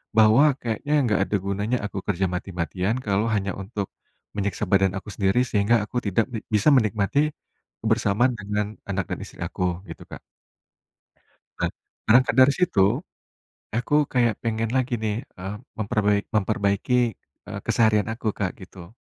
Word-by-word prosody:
Bahwa 115 +7 +6
kayaknya 120 +6 -2
enggak 105 -5 +1
ada 105 - 0
gunanya 100 +5 0
aku 100 -1 -4
kerja 95 -1 +1
mati-matian, 90 +3 -2
kalau 105 +2 +1
hanya 100 -1 -1
untuk 100 0 -5 0.4
menyiksa 100 -2 -2
badan 95 -1 +3
aku 95 - -6
sendiri 100 +6 +2
sehingga 105 -1 +2
aku 120 +3 -2
tidak 105 +3 +2
bi 115 - -3 0.2
bisa 105 +8 +4
menikmati, 110 -1 +2 0.6
kebersamaan 110 +2 +2
dengan 105 +1 -1 0.2
anak 95 -2 -1
dan - - -3
istri - - -13
aku, - - -3 0.3
gitu, - - -9
Kak. - - -8 1.4
Be - - +1 0.4
berangkat 125 +2 +5
dari 130 +2 +7
situ, 180 - +2 1.0
aku 120 +4 0 0.2
kayak 120 -4 +3
pengen 115 -1 -1
lagi 130 -1 +1
nih, 105 -1 0 0.2
eee, 95 +3 -5 0.2
memperbai 105 -1 +1 0.2
memperbaiki, 105 +3 +1 0.5
eee, - - -5
keseharian 110 -2 +3
aku, 115 0 -8
Kak, 95 -3 -1
gitu. 95 0 -12
105 Hz, 145 wpm, -24 LUFS, 100-115 Hz, 1.4 s, dari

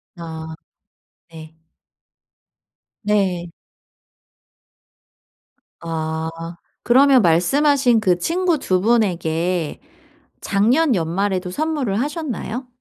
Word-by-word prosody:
아 160 -2 -8 0.7
네. 160 -1 -12 1.5
네. 190 -5 0 2.3
아. 160 -1 -3 0.5
그러면 265 +1 +5
말씀하신 245 - +3
그 185 -4 +2
친구 340 - 0
2 185 -9 0
분에게 175 -7 0 0.6
작년 245 +9 +2
연말에도 185 +2 -1
선물을 285 - -1
하셨나요? 270 -4 -4
195 Hz, 140 characters per minute, -20 LUFS, 170-260 Hz, 2.3 s, 그러면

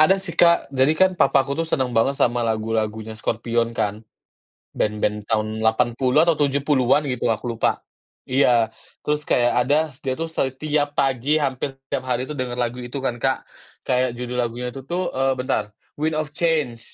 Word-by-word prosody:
ada 190 +5 +6
sih, 190 -3 -6
Kak, 170 -4 +3
jadi 135 +3 +4
kan 190 +1 +5
papaku 140 -6 +2
tuh 165 +3 -1
seneng 130 -5 0
banget 120 +5 +2
sama 120 -2 +2
lagu-lagunya 110 -1 -2
Scorpions 115 +1 -1
kan. 105 +1 -1 0.7
Band-band 105 0 -1
tahun 110 0 -1
80 120 +5 +2
atau 170 - +4
70-an 140 -1 +2
gitu 125 -1 -2
aku 115 +2 -1
lupa. - - +1 0.4
Iya, 120 -4 +3 0.3
terus 150 0 0
kayak 120 0 +3
ada 145 +3 +3 0.2
s 130 - -18
dia 130 -1 -2
s - - -19
tuh 165 - -2
setiap 145 0 -1
pagi 135 +2 +1
hampir 135 0 -2 0.2
tiap 135 -2 -2
hari 125 0 0
tuh - - -1
dengar 125 -1 -2
lagu 120 0 -2
itu 120 +3 -7
kan, 120 -2 -1
Kak, 135 -1 0 0.4
kayak 125 -1 +1
judul 125 0 -4
lagunya 120 +1 -3
itu 135 - -7
tuh, 180 +3 -2
eee, 135 0 +1
bentar 125 -4 -2 0.2
"Wind 155 +1 0
of 155 -1 -2
Change," 150 -8 0
130 Hz, 175 wpm, -22 LUFS, 115-145 Hz, 0.7 s, ada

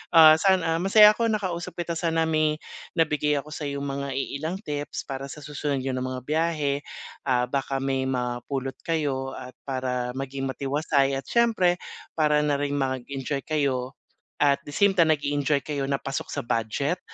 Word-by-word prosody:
Ah, 160 -1 +9
sana 165 -4 +3
masaya 210 +3 +8
ako 230 - +1
nakausap 185 -6 -2
kita, 170 0 -2
sana 165 -1 +1
may 155 -1 +2 0.4
nabigay 150 -2 +2
ako 150 +2 -10
sa'yong 140 -2 -4
mga 140 0 -3
iilang 150 +5 -3
tips 145 0 -4
para 135 0 -5
sa 145 +1 -9
susunod 145 -2 -2
niyo 135 - -1
na 130 - -2
mga 130 0 -4
biyahe, 155 -1 0 0.5
ah, 125 -2 +3
baka 135 -1 -1
may 135 -1 0
mapulot 130 +1 -2
kayo 140 -5 -1
at 130 0 -8 0.2
para 125 -1 -2
maging 135 0 -3
matiwasay 140 +1 +1
at - - -12
siyempre 225 -7 +3 0.4
para 150 -2 +3
na 150 -1 +1
rin 145 0 -1
mag-enjoy 135 +1 -2
kayo 135 -5 0 0.5
at 140 -1 +4
the - - -6
same 200 +2 +3
time 165 -3 +5
nag-e-enjoy 145 -1 +1
kayo 145 -2 -2
na 140 -1 0
pasok 135 -1 -4
sa - - -2
budget, 130 +10 -1
145 Hz, 165 wpm, -26 LUFS, 135-160 Hz, 0.5 s, Ah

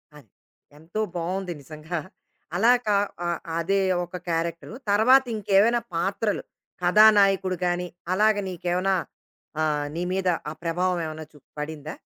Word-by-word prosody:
అది. 140 -8 -16 0.5
ఎంతో 170 +8 -4
బావుంది 180 +1 -2
నిజంగా. 155 +4 -6 0.6
అలా 225 +7 +5
కా 210 -2 +3 0.3
ఆ - - 0 0.3
అదే 195 +4 +1 0.3
ఒక 175 +1 -7
క్యారెక్టరు. 165 +3 -2 0.2
తర్వాత 250 +6 +6
ఇంకేవైనా 210 +3 +3 0.2
పాత్రలు, 200 +5 -1 0.4
కథానాయకుడు 195 -1 +5
గానీ, 175 0 0 0.3
అలాగ 215 +3 +4
నీకేవన్నా 180 +2 0 0.7
ఆహ్, 150 -2 0
నీ 170 - -3
మీద 190 -1 -1 0.2
ఆ - - -4
ప్రభావం 180 +2 0
ఏవన్నా 155 0 -6
చు 150 - -16 0.2
పడిందా? 150 0 -5
180 Hz, 125 wpm, -25 LUFS, 165-200 Hz, 0.7 s, తర్వాత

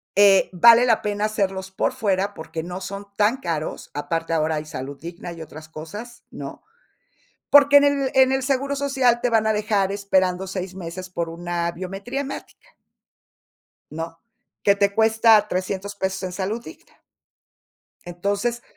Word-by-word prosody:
eh, 200 -1 +6
vale 230 +7 +7
la 225 -2 +3
pena 205 0 -1
hacerlos 195 -3 -2
por 190 - -1
fuera, 200 -5 0
porque, 160 -2 -6
no 180 +2 -6
son 200 +1 -6
tan 215 +5 +3
caros, 165 - -4
aparte 165 +3 -2
ahora 160 0 +1
hay 150 0 -4
Salud 140 -1 -7
Digna 170 +1 -8
y 165 - -10
otras 155 0 -12
cosas, 205 +10 -9
¿no? - - -8 0.9
Porque 285 0 +8
en 285 - +3
el 280 -2 +1
en 265 0 +5
el 265 -1 0
seguro 275 +1 0
social, 265 -4 +2
te 245 - +1
van 225 -1 +2
a - - +3
dejar 210 -2 0
esperando 190 -2 0
6, 185 -1 -5
meses 185 +1 -7
por 170 -2 -3
una 170 0 -3
biometría 195 +9 -5
hemática. 280 -1 -8 1.2
¿No? 165 +1 -6 0.5
Que 200 - +5
te 200 0 +2
cuesta 220 -1 +5
$300 190 +2 -3
pesos 190 -1 -3
en 185 - -3
salud 200 +5 -3
digna. 325 - -15 1.0
Entonces, 200 +7 -2
195 Hz, 155 wpm, -23 LUFS, 175-230 Hz, 1.2 s, Porque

